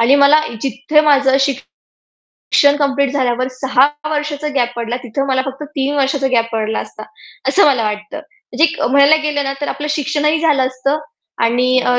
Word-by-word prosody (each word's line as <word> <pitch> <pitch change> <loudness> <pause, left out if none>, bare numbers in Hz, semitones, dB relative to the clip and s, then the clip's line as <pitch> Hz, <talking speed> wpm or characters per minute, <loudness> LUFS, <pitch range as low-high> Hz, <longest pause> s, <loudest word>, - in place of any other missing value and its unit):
आणि 245 +4 +4
मला 300 +2 +5 0.2
जिथे 270 +4 +1
माझं 275 -2 +4 1.0
शिक्षण 285 0 +2
कंप्लीट 280 -1 0
झाल्यावर 255 -2 0
6 265 0 +3 0.2
वर्षाचा 300 0 -3
गॅप 245 -3 0
पडला, 235 0 -3
तिथं 265 +3 -3
मला 260 -1 +1
फक्त 270 +2 -6
3 275 +1 -1
वर्षाचा 275 0 0
गॅप 230 -2 +2
पडला 220 0 -2
असता. - - -10 0.5
असं 400 - +4
मला 265 -5 +2
वाटतं. 210 0 -5
म्हणजे 320 -2 -2
म्हणायला 280 +3 +5
गेलं 290 -2 -1
ना 275 - -2
तर 290 - -3
आपलं 295 +1 -4
शिक्षणही 300 +1 0
झालं 290 -5 +2
असतं 260 +3 -2 0.4
आणि 240 +2 +2 0.2
अ, 245 0 +2
275 Hz, 165 wpm, -16 LUFS, 250-295 Hz, 1.0 s, मला